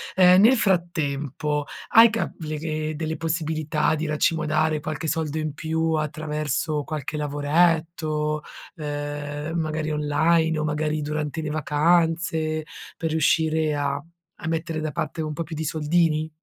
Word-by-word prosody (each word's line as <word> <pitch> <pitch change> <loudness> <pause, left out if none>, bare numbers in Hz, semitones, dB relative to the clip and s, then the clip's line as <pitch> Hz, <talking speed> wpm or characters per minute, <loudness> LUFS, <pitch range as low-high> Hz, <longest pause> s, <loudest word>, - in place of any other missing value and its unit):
Ehm, 185 0 +7
nel 245 +5 +6
frattempo, 150 - 0 0.2
hai 230 +1 +8
ca 225 +1 -2
le 155 -2 -4
le 155 0 -3
delle 160 +1 -3
possibilità 155 -1 0
di 160 0 -2
racimolare 155 0 +1
qualche 155 +1 -4
soldo 155 0 -1
in 155 -2 -2
più 160 +2 -1
attraverso 155 -1 -1
qualche 150 0 -4
lavoretto, 155 +1 +1 0.4
ehm, 145 +1 -4
magari 155 -1 -2
online 160 +2 +2
o 155 - -1
magari 155 0 -1
durante 150 +1 -3
le 155 - -3
vacanze 160 +1 +1 0.3
per 165 -1 -2
riuscire 160 0 +2
a 145 0 -1 0.4
a 160 - -4
mettere 165 0 -2
da 155 0 -2
parte 160 - -3
un 155 -1 -3
po' 170 - -3
più 165 - -9
di 160 +1 -3
soldini? 155 0 +1
155 Hz, 140 wpm, -24 LUFS, 150-160 Hz, 0.4 s, hai